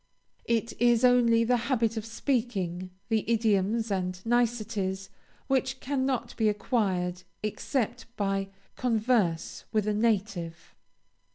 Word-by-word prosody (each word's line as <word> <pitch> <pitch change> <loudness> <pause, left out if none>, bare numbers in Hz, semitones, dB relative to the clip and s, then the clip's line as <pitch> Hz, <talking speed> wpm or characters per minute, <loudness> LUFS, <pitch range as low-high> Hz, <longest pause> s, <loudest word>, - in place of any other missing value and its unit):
It 230 0 0
is 240 0 +5
only 235 -2 +5
the 245 +2 +3
habit 230 -3 +2
of 220 0 -4
speaking, 220 -8 -1 0.2
the 220 -1 +2
idioms 220 0 +2
and 185 -1 -1
niceties, 220 -5 0 0.3
which 265 -1 0
cannot 260 -3 -1
be 220 -2 +3
acquired 190 -5 0 0.2
except 235 +2 -2
by 195 -1 0 0.3
converse 220 -8 0
with 215 -2 +1
a 210 - +2
native. 200 -6 -1
225 Hz, 110 wpm, -28 LUFS, 195-240 Hz, 0.3 s, is